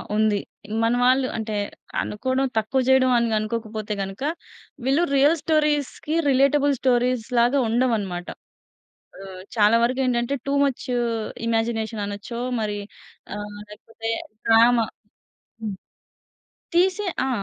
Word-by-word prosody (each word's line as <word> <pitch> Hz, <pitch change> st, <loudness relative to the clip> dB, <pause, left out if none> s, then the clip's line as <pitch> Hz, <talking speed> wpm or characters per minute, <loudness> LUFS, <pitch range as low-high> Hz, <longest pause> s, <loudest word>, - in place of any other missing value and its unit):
ఉంది. 215 Hz, -1 st, +3 dB, 0.5 s
మన 230 Hz, -, +3 dB
వాళ్ళు 255 Hz, +1 st, +4 dB
అంటే, 220 Hz, -1 st, -3 dB, 0.5 s
అనుకోవడం, 260 Hz, +5 st, -1 dB
తక్కువ 220 Hz, +5 st, +1 dB
చేయడం, 260 Hz, -1 st, +5 dB
అని 235 Hz, 0 st, +2 dB
అనుకోకపోతే 215 Hz, -1 st, -4 dB
గనుక, 195 Hz, +6 st, -5 dB, 0.6 s
వీళ్ళు 275 Hz, +6 st, +3 dB
రియల్ 285 Hz, +4 st, +5 dB
స్టోరీస్‌కి 300 Hz, -1 st, 0 dB, 0.2 s
రిలేటబుల్ 280 Hz, +2 st, +3 dB
స్టోరీస్ 250 Hz, -2 st, +1 dB
లాగా, 245 Hz, +4 st, +3 dB
ఉండవు 240 Hz, +2 st, +2 dB
అన్నమాట. 180 Hz, -3 st, -5 dB, 0.9 s
ఆహ్, 190 Hz, -1 st, -9 dB
చాలా 215 Hz, +1 st, +5 dB
వరకు 255 Hz, +3 st, +1 dB
ఏంటంటే, 240 Hz, +2 st, 0 dB
టూ 275 Hz, -, 0 dB
ముచ్ 275 Hz, -3 st, -1 dB, 0.6 s
ఇమాజినేషన్ 225 Hz, -1 st, -1 dB
అనచ్చో, 205 Hz, +4 st, -6 dB, 0.2 s
మరి 210 Hz, -1 st, -2 dB, 0.6 s
ఆహ్, 205 Hz, 0 st, -7 dB
లేకపోతే 225 Hz, +2 st, -7 dB, 0.4 s
డ్రామా 230 Hz, 0 st, +5 dB, 0.8 s
హ్మ్. 205 Hz, -3 st, -3 dB, 1.0 s
తీసే 375 Hz, +3 st, +3 dB, 0.2 s
ఆ! -, -, -1 dB
235 Hz, 115 wpm, -23 LUFS, 215-265 Hz, 1.0 s, చేయడం